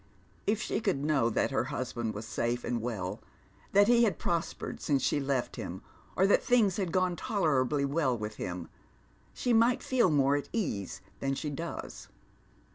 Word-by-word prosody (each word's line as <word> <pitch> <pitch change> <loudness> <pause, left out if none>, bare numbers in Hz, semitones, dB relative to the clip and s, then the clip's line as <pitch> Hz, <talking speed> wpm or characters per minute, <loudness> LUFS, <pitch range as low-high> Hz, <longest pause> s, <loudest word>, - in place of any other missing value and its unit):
If 210 +1 +2
she - - -1
could 190 -10 0
know 140 -7 +3
that 115 - 0
her 135 - +1
husband 125 -5 -3
was 105 +2 -5
safe 120 +2 -1
and 120 -2 -1
well, 105 -6 -4 0.5
that 200 +1 +5
he 240 0 +5
had 205 -8 +2
prospered 170 -1 -3
since 140 -3 +1
she 150 - +2
left 135 -3 -1
him, - - -6 0.3
or 190 - +4
that 200 - +4
things 220 -7 +3
had 190 -5 -1
gono 185 0 +2
tolerably 150 - +1
well 140 -3 +1
with 105 0 -5
him, 90 -1 -4 0.6
she 245 - 0
might 230 +2 +4
feel 245 -7 +3
more 140 -2 +3
at 145 -1 -3
ease 150 - -2 0.2
than 135 0 -1
she 150 +1 -3
does. 165 +4 -6
145 Hz, 175 wpm, -30 LUFS, 125-195 Hz, 0.6 s, that